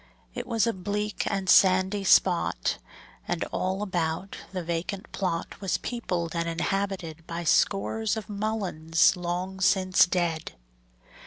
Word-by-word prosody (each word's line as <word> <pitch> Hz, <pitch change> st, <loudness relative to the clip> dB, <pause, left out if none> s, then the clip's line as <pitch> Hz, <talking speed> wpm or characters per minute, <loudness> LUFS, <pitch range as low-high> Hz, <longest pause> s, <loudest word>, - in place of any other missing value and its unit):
It -, -, -5 dB
was 225 Hz, -1 st, +2 dB
a 230 Hz, -, +1 dB
bleak 205 Hz, +3 st, -3 dB
and 195 Hz, -2 st, -2 dB
sandy 190 Hz, +2 st, +5 dB
spot, 175 Hz, -, +3 dB, 0.5 s
And, -, -, -1 dB
all 190 Hz, +2 st, -1 dB
about, 175 Hz, -1 st, -2 dB, 0.2 s
the 185 Hz, -2 st, -4 dB
vacant 170 Hz, +4 st, -4 dB
plot 180 Hz, -1 st, -3 dB
Was 195 Hz, -, 0 dB
peopled 180 Hz, -9 st, -3 dB
and 170 Hz, 0 st, -1 dB
inhabited 175 Hz, -2 st, -3 dB
By 170 Hz, +1 st, -4 dB
scores 210 Hz, +6 st, +1 dB
of 220 Hz, -, -6 dB
mulleins 195 Hz, -6 st, +1 dB
long 180 Hz, +2 st, -3 dB
since 185 Hz, -1 st, +4 dB
dead. 170 Hz, -3 st, -1 dB
185 Hz, 130 wpm, -27 LUFS, 170-200 Hz, 0.5 s, sandy